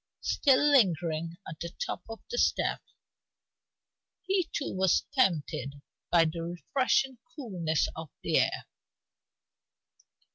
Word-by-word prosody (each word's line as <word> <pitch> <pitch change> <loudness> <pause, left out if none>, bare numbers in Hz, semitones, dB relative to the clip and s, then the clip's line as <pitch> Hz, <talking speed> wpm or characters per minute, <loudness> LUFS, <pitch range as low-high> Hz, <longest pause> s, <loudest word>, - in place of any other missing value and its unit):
Still 290 +1 +3
lingering 170 - +2
at 155 - -8
the 170 - -4 0.2
top - - -4
of 225 - -8
the 485 - -1
steps, - - 0 1.3
he 375 -3 0
too 285 - -3
was 190 -1 +3
tempted 155 - +1 0.3
by 170 -1 +5
the 165 +1 -3
refreshing 245 - 0 0.2
coolness 180 - -1
of 160 -2 -7
the - - +3
air. - - 0
175 Hz, 110 wpm, -29 LUFS, 165-265 Hz, 1.3 s, by